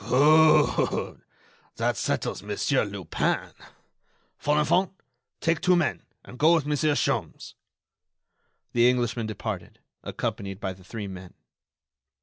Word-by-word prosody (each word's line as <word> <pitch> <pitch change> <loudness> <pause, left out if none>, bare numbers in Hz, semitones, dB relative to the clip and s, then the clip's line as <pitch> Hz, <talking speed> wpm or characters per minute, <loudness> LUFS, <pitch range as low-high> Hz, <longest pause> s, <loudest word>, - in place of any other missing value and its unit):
"Good! 155 +5 +4 0.5
That - - 0
settles - - -2
Monsieur - - 0
Lupin.... - - -2 0.9
Folenfant, 150 +6 +2 0.5
take 165 -1 +1
two 180 - +4
men, 165 -8 0 0.2
and 125 - -12
go 160 +3 +5
with 160 -4 0
Monsieur 150 0 +1
Sholmes." - - -2 1.2
The 120 +1 +5
Englishman 120 -2 -1
departed, 110 - -6 0.2
accompanied 100 -4 -4
by 95 -3 -3
the 95 0 -18
three 105 +3 -6
men. 95 -1 -10
125 Hz, 110 wpm, -26 LUFS, 110-155 Hz, 1.2 s, go